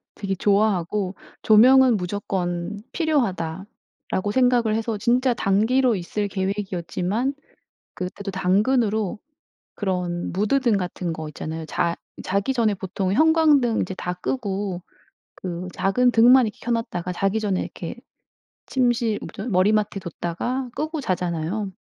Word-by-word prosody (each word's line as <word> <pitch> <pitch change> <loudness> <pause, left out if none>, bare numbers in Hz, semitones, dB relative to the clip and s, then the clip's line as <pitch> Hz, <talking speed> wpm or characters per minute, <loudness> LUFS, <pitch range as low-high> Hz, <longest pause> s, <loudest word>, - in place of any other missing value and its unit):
되게 195 -1 -3
좋아하고 200 -1 +1 0.3
'조명은 250 +2 +6
무조건 180 0 -3
필요하다.'라고 205 - -2
생각을 245 -3 +3
해서 225 -1 -2
진짜 245 +4 +2
단기로 230 +4 +2
있을 205 +3 -3
계획이었지만 195 +4 -2 0.6
그때도 195 +2 -5
당근으로 210 +2 +1 0.6
그런 180 -3 -2
무드 210 +9 +2
등 235 -6 +2
같은 180 -2 -3
거 160 -1 -6
있잖아요. 160 +2 -6
자 170 +1 -1 0.3
자기 200 +7 0
전에 230 -4 +2
보통 190 0 -2
형광등 300 -4 +4
이제 185 - -3
다 180 -1 -3
끄고 195 -2 -3 0.5
그 180 -1 -5
작은 245 +6 +2
등만 245 +2 +6
이렇게 210 - -7
켜 240 - -3
놨다가 185 -6 -2
자기 195 +4 0
전에 200 -3 0
이렇게 - - -7 0.7
침실 240 -4 +1
뭐죠 200 - -7
머리맡에 205 +2 +2
뒀다가 190 +10 -3
끄고 310 0 -3
자잖아요. 180 - -2
205 Hz, 290 characters per minute, -23 LUFS, 185-240 Hz, 0.7 s, 조명은